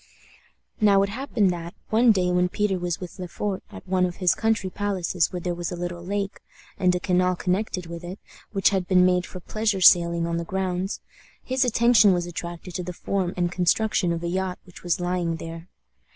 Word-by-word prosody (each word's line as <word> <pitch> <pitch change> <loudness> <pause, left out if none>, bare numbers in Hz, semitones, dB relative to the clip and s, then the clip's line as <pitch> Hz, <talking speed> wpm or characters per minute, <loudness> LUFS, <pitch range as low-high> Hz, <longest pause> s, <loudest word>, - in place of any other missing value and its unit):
Now 200 -2 +5
it 200 - -1
happened 220 -4 0
that, 170 -1 -6 0.2
one 230 +2 +5
day 180 -3 +1
when 180 0 +2
Peter 195 -1 0
was 175 -2 -2
with 180 0 -9
Le 180 - -4
Fort 195 +3 -3
at - - -11
one 185 0 +1
of 175 - -7
his 180 -3 +3
country 220 -4 0
palaces 185 -4 -1
where 180 - -4
there 175 0 -2
was 175 -1 -4
a - - -3
little 175 0 -5
lake, 200 +1 -3 0.4
and 180 -1 +3
a - - 0
canal 180 0 +1
connected 185 0 -2
with 170 +1 -8
it, 180 +3 -7 0.3
which 195 -3 +3
had 190 -3 -1
been 180 -1 +5
made 180 -1 +2
for 185 - -8
pleasure 215 +2 -1
sailing 170 -2 +5
on 170 0 -1
the 170 - -2
grounds, 190 +1 -2 0.4
his 260 +1 +1
attention 235 -4 +5
was 175 -1 -1
attracted 175 +1 -7
to 180 - -3
the 180 +1 -5
form 185 0 -2
and 175 -1 0
construction 180 +1 +1
of 170 0 -3
a - - -1
yacht 185 +1 -2
which 180 - -14
was 175 -1 0
lying 175 -2 -1
there. 165 +2 -8
180 Hz, 210 wpm, -25 LUFS, 175-195 Hz, 0.4 s, Now